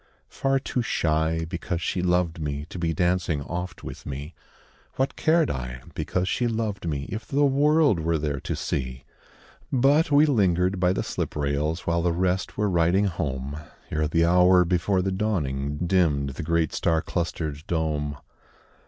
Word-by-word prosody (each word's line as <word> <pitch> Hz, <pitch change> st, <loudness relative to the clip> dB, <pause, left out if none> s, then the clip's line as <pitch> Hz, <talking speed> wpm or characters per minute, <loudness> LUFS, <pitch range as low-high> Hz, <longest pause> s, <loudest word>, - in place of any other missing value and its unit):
Far 135 Hz, 0 st, 0 dB
too 130 Hz, -2 st, -2 dB
shy, 80 Hz, -5 st, 0 dB
because 85 Hz, 0 st, -3 dB
she 90 Hz, +1 st, -1 dB
loved 90 Hz, -1 st, +1 dB
me, 75 Hz, -1 st, -3 dB
To 90 Hz, -, -7 dB
be 85 Hz, -1 st, 0 dB
dancing 85 Hz, -3 st, 0 dB
oft 90 Hz, +3 st, -5 dB
with -, -, -8 dB
me; 70 Hz, +4 st, -6 dB, 0.6 s
What 135 Hz, +1 st, 0 dB
cared 160 Hz, -1 st, +3 dB
I, 60 Hz, -1 st, -5 dB
because 90 Hz, 0 st, -1 dB
she 120 Hz, +5 st, 0 dB
loved 110 Hz, -5 st, -2 dB
me, 70 Hz, -2 st, -3 dB
If 110 Hz, 0 st, -5 dB
the 145 Hz, +1 st, +2 dB
world 145 Hz, -, +3 dB
were 80 Hz, 0 st, +1 dB
there 75 Hz, -2 st, -2 dB
to -, -, -3 dB
see? 65 Hz, -1 st, -3 dB, 0.7 s
But 140 Hz, +5 st, +4 dB
we 145 Hz, +1 st, +6 dB
lingered 95 Hz, -, +2 dB
by 90 Hz, 0 st, +3 dB
the -, -, -1 dB
slip -, -, -3 dB
rails 75 Hz, +3 st, -1 dB
While 85 Hz, 0 st, 0 dB
the 85 Hz, 0 st, +1 dB
rest 90 Hz, +2 st, -1 dB
were 105 Hz, 0 st, +1 dB
riding 90 Hz, +2 st, +3 dB
home, 70 Hz, -5 st, -3 dB, 0.3 s
Ere 75 Hz, 0 st, 0 dB
the 85 Hz, +2 st, +2 dB
hour 90 Hz, +1 st, +5 dB
before 90 Hz, +2 st, +1 dB
the 95 Hz, -, 0 dB
dawning, 75 Hz, -9 st, -1 dB
Dimmed 80 Hz, -7 st, +2 dB
the 65 Hz, -, -6 dB
great 85 Hz, -1 st, 0 dB
star 80 Hz, 0 st, +1 dB
clustered 80 Hz, -4 st, -3 dB
dome. 75 Hz, -3 st, -1 dB
85 Hz, 165 wpm, -25 LUFS, 75-95 Hz, 0.7 s, we